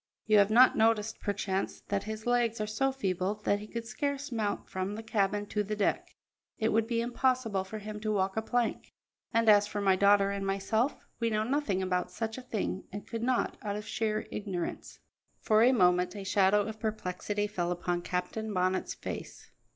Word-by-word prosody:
You 215 -1 +5
have 200 0 +5
not 245 +4 +6
noticed, 220 -1 +2
perchance, 195 -2 -2
that 200 -1 -1
his 220 0 -6
legs 240 -2 +1
are 215 - 0
so 270 +6 0
feeble 195 -6 -1
that 205 - +2
he 210 - -9
could 230 +1 -5
scarce 280 +3 -3
mount 215 -3 -2
from 190 +2 -3
the 220 - -6
cabin 205 -2 0
to 210 - 0
the 210 +1 -3
deck. 205 - -1 0.4
It 220 0 +1
would 225 0 +2
be 230 -1 0
impossible 240 -4 0
for 195 +3 -7
him 210 0 -6
to 215 0 -2
walk 190 -2 0
a 220 - 0
plank; 240 +1 -1 0.4
and 230 -1 +2
as 205 -1 +6
for 210 - -4
my 195 -2 +4
daughter 200 +1 +4
and 200 0 -3
myself, 200 +7 0 0.2
we 230 -1 +1
know 215 -1 +1
nothing 225 -7 0
about 180 -1 0
such 220 +5 -4
a - - -8
thing, 220 -6 -3
and 205 +1 -7
could 230 -1 -5
not, 250 +1 0
out 205 -1 -3
of 210 0 -5
sheer 215 -2 -1
ignorance." 190 -5 -4 0.4
For 215 -1 +3
a 245 +3 +6
moment 180 -5 +3
a 200 - -5
shadow 195 +1 +3
of 220 +1 -6
perplexity 205 -1 -2
fell 180 -4 -2
upon 175 0 -1
Captain 180 +5 -3
Bonnet's 185 -1 0
face. - - -7
210 Hz, 195 wpm, -30 LUFS, 195-225 Hz, 0.4 s, not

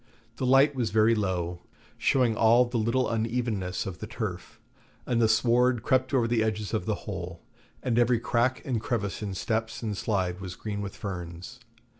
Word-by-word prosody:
The 130 - -1
light 135 +3 +5
was 120 -5 -1
very 110 +2 +4
low, 90 -5 -2 0.3
showing 125 -4 +2
all 115 +3 +5
the 120 -1 -2
little 115 +4 +1
unevennesses 110 -5 -1
of 95 -3 -6
the - - -6
turf; - - -6 0.5
and 120 -2 +1
the 110 - +5
sward 120 +1 +3
crept 130 -1 +2
over 125 -4 +2
the 115 -1 +2
edges 110 -1 -2
of 110 - -1
the 110 - +1
hole, 90 -4 -6 0.4
and 120 -2 +1
every 120 -1 +3
crack 120 +2 0
and 120 -5 -1
crevice 105 -4 -2
in 100 -2 -4
steps 115 +4 -2
and 105 -2 -2
slide 95 -3 -1
was 90 -2 -6
green 105 0 -4
with 100 -1 -6
ferns. 90 +4 -7
110 Hz, 180 wpm, -27 LUFS, 100-120 Hz, 0.5 s, light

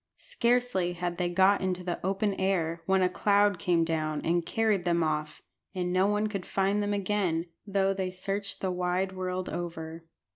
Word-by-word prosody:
Scarcely 235 -7 +1
had 175 0 -3
they 175 -1 +1
got 190 +3 +4
into 185 -1 -1
the 175 -1 -4
open 195 +2 0
air 170 -3 0
when 190 -1 +3
a - - +5
cloud 200 +1 +2
came 170 -2 +2
down 155 -2 -1
and 170 +1 +2
carried 215 0 +1
them 170 -1 +2
off, 150 -1 -2 0.3
and 180 -1 -1
no 185 +2 +3
one 210 +1 +1
could 200 -3 -3
find 195 +2 +1
them 205 0 -1
again, 195 -4 0 0.2
though 195 -1 +2
they 190 -1 -2
searched 195 +2 -3
the 190 - 0
wide 180 +1 0
world 185 0 -3
over. 165 -1 -5
185 Hz, 180 wpm, -29 LUFS, 175-200 Hz, 0.3 s, a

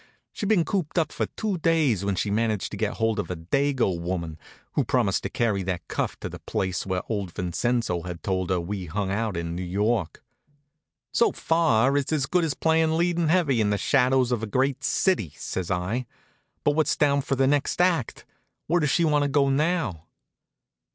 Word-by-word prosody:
She'd 205 - -4
been 185 -7 +3
cooped 185 -5 -2
up 160 -3 +2
for - - -2
two 205 -5 -3
days 155 - +2
when 100 -1 0
she 100 +2 -1
managed 110 -1 0
to - - -5
get - - -1
hold 110 -1 0
of - - -3
a 90 - -2
Dago 120 - 0
woman 85 -3 -4 0.3
who - - +2
promised - - +1
to - - -4
carry 110 -4 0
that 90 -2 -4
cuff - - -3
to - - -3
the - - -8
place 95 0 -2
where 95 -1 -1
old 100 -5 -3
Vincenzo 90 +1 -1
had 90 0 -7
told 95 -2 -1
her 90 -1 +1
we 90 +1 -4
hung 95 +3 -2
out 105 -2 -1
in 85 0 -3
New 90 - -4
York. 100 +1 -1 0.9
"So 235 - +3
far 140 -6 +2
it's 140 +1 -1
as 150 -3 +1
good 175 +5 +1
as 155 -4 -1
playin' 160 0 +2
leading 170 -1 +1
heavy 155 -8 +2
in 105 - +2
'The 105 - +1
Shadows 130 +2 +2
of 120 -3 0
a 110 - -3
Great 130 +5 0
City,'" 135 - +1
says 90 -2 -4
I, 95 +7 -2 0.6
"but 145 - +4
what's 155 +1 +1
down 140 -1 +3
for 135 0 -1
the 135 0 +2
next 145 +4 +1
act? 175 -9 +1 0.4
Where 175 +3 +2
does 150 -3 +1
she 170 +4 +3
want 150 -2 +3
to 145 - +2
go 140 -1 +3
now?" 150 - 0
120 Hz, 200 wpm, -25 LUFS, 95-150 Hz, 0.9 s, but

